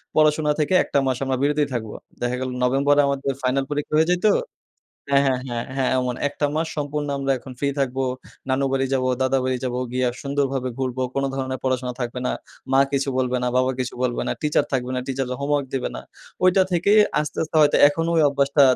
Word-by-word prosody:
পড়াশোনা 155 0 +3
থেকে 150 +4 +1
১ - - -12
টা 140 - +5
মাস 130 -2 0
আমরা 135 -1 0
বিরতই 145 +1 +2
থাকবো। 110 -3 -4 0.3
দেখা 120 +1 0
গেলো 130 0 -3
নভেম্বরে 140 +3 +3
আমাদের 140 0 -1
ফাইনাল 130 +1 +1
পরীক্ষা 145 +1 -3
হইয়া 160 +2 +3
যাইত 180 +4 +2 0.8
হ্যাঁ, 140 0 +5
হ্যাঁ, 130 -1 +1
হ্যাঁ, 120 -1 -3
হ্যাঁ 130 -2 +1
এমন, 125 -1 -1
১ 145 - -15
টা 145 - +3
মাস 160 +1 0
সম্পূর্ণ 145 0 -2
আমরা 135 0 +1
এখন 130 +1 -10
ফ্রি 140 - 0
থাকব। 130 -1 -1 0.5
নানু 130 +1 +1
বাড়ি 135 0 +1
যাবো, 130 -1 +1
দাদা 130 +1 +2
বাড়ি 130 0 0
যাবো 125 -1 -2
গিয়া 125 0 +1
সুন্দরভাবে 140 -2 -1
ঘুরবো। 130 -1 -2
কোন 140 - 0
ধরনের 130 -1 -3
পড়াশোনা 130 -1 0
থাকবে 120 +1 -3
না। - - 0 0.4
মা 135 - +5
কিছু 140 0 0
বলবে 130 -1 +1
না, 125 - +1
বাবা 130 0 +3
কিছু 125 - -3
বলবে 125 -1 0
না। - - +1
টিচার 150 -1 +2
থাকবে 125 -1 -1
না, - - 0
টিচাররা 130 -1 -2
হোমওয়ার্ক 140 0 0
দিবে 130 - -1
না। - - -6 0.4
ঐটা 185 +1 +5
থেকেই 195 +5 +4 0.2
আস্তে, 150 0 -4
আস্তে 160 0 -3
হয়তো 150 - +5
এখনো 165 +3 -1
ওই 160 - +5
অভ্যাসটা 140 +1 +2
135 Hz, 210 wpm, -23 LUFS, 130-145 Hz, 0.8 s, টা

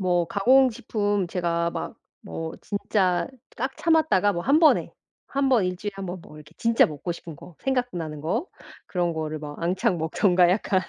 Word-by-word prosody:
뭐 175 -2 +1
가공식품 215 -3 +2
제가 170 -1 -1
막 220 - -5 0.3
뭐 165 -5 -6
진짜 190 -3 0 0.3
딱 260 +2 -3
참았다가 315 - +3
뭐 175 -2 -3
한번에, 305 +5 +4 0.4
1 275 -1 0
번. 240 -7 +4
1 180 0 -2
주일에 205 +2 -5
1 195 -1 -6
번 180 +1 -6
뭐 150 - -14
이렇게 150 +2 -15
진짜 230 0 +4
먹고 155 +3 -3
싶은 165 -2 -10
거 170 - -13
생각나는 180 - -2
거 215 - -2 0.4
그런 175 -2 -1
거를 155 -1 -4
막 145 -1 -8
왕창 185 +4 +1
먹던가 175 +2 +3
약간 190 0 +1
185 Hz, 290 characters per minute, -25 LUFS, 170-230 Hz, 0.4 s, 한번에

